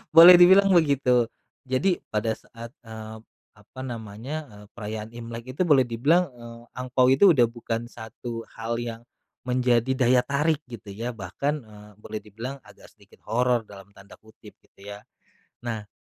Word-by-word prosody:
Boleh 175 +2 +11
dibilang 190 +3 +7
begitu. 135 -7 +3 0.4
Jadi 175 +9 +1
pada 110 +1 -1
saat, 115 0 -12
eee, 110 0 -9 0.4
apa 105 +6 -15
namanya, 115 +3 -6 0.2
eee, 105 0 -13
perayaan 110 0 -6
Imlek 115 +2 -8
itu - - 0
boleh 140 -4 +5
dibilang, 150 +10 +2
eee, 120 -1 -12 0.2
angpao 125 0 +1
itu 170 +8 +6
udah 125 -5 +4
bukan 115 0 -4
satu 115 0 -8
hal 115 +1 -3
yang 115 -1 -6 0.5
menjadi 125 0 +2
daya 125 -1 +4
tarik 150 +2 +1
gitu 105 -4 -9
ya. 115 +4 -4
Bahkan, 115 +9 -3
eee, 105 -1 -15
boleh 110 0 -6
dibilang 115 +6 -7
agak - - -17
sedikit 100 -2 -23
"horor" 120 +1 +1
dalam 100 0 -14
tanda 100 +1 -15
kutip 110 0 -17
gitu - - -30
ya. 100 0 -8 0.6
Nah 110 -3 -4
120 Hz, 155 wpm, -25 LUFS, 110-130 Hz, 0.6 s, Boleh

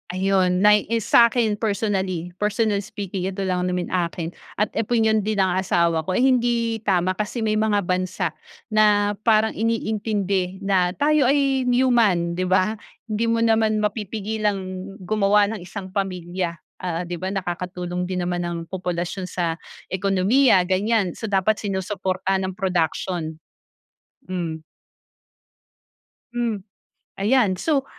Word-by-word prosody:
Ayun 185 -1 +2
nay 210 0 +6
is 230 -3 0
sa 235 -1 +7
akin 230 -3 +1
personally 195 -5 -2
personally 210 0 +1
speaking, 195 -3 -4
eto 195 0 -3
lang 180 -1 0
naman 180 -1 -2
akin 170 -1 -2 0.3
at 210 - +3
opinyon 220 -1 +2
din 215 +1 -1
ng 190 -1 +3
asawa 170 -3 +2
ko. 185 - -3
Ay 255 - +3
hindi 235 -3 +1
tama 185 -2 +2
kasi 210 +5 -3
may 215 - +1
mga 215 -1 +2
bansa 185 +1 -1 0.4
na 205 -1 +4
parang 220 -1 +3
iniintindi 205 -4 -1
na 185 -2 +2
tayo 290 -2 +3
ay 275 -2 +2
human, 230 -9 +3
di 185 - -1
ba? 185 +3 +2 0.3
Hindi 215 +1 -1
mo 230 - +1
naman 220 -1 +3
mapipigilang 210 -1 -1 0.4
gumawa 205 +1 +3
ng - - -7
isang 185 +1 -7
pamilya, 180 -3 -3 0.2
ah, 175 -1 -2
di 175 - -3
ba, 185 +2 -4
nakakatulong 180 -1 -3
din 180 0 -2
naman 175 0 -1
ang 175 0 -3
populasyon 180 +1 -3
sa 170 -2 -1 0.3
ekonomiya, 195 +2 +3
ganyan. 195 0 +1
So 220 -2 -6
dapat 195 +2 +3
sinusuportahan 190 -1 -1
ng 190 - -5
production. 170 -3 -1 0.9
Hmm. 165 -4 -3 1.7
Mm, 230 -5 -2 0.6
ayan, 215 -2 +3
so 285 -4 +1
195 Hz, 135 wpm, -23 LUFS, 180-220 Hz, 1.7 s, sa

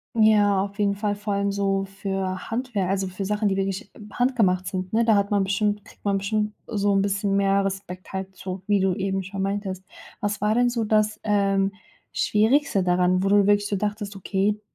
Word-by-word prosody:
Ja, 205 -3 +4
auf 200 +1 -7
jeden 200 -1 +2
Fall- 205 0 -1
vor 205 0 -3
allem 200 0 0
so 195 -1 0
für 195 -1 -4
Handwerk, 225 -5 -2
also 195 0 0
für 185 +2 -5
Sachen, 210 +1 0
die 195 - +1
wirklich 195 +3 -3 0.2
handgemacht 215 -8 +1
sind, 185 0 -4
ne? 230 +1 +2
Da 225 - +5
hat 200 0 +1
man 205 -1 +2
bestimmt 205 +1 0
kriegt - - -18
man 200 -1 +1
bestimmt 210 +2 -1
so 205 -2 0
'n 195 0 +3
bisschen 200 0 0
mehr 195 0 +3
Respekt, 190 -2 -5
halt 190 0 -5
so, 185 0 -6
wie 205 0 +2
du 190 -1 +1
eben 195 0 -1
schon 190 +1 -4
meintest. 195 -1 -3 0.3
Was 205 -1 -2
war 210 +1 +2
denn 245 0 +3
so 235 -2 -1
das, 215 0 +1
ähm, 195 -1 +1 0.4
Schwierigste 220 -1 +2
daran, 180 0 +2
wo 195 - +1
du 205 0 +5
wirklich 205 0 +3
so 205 - -1
dachtest: 205 0 -3
„Okay, 195 +2 0
200 Hz, 205 wpm, -24 LUFS, 195-210 Hz, 0.4 s, Da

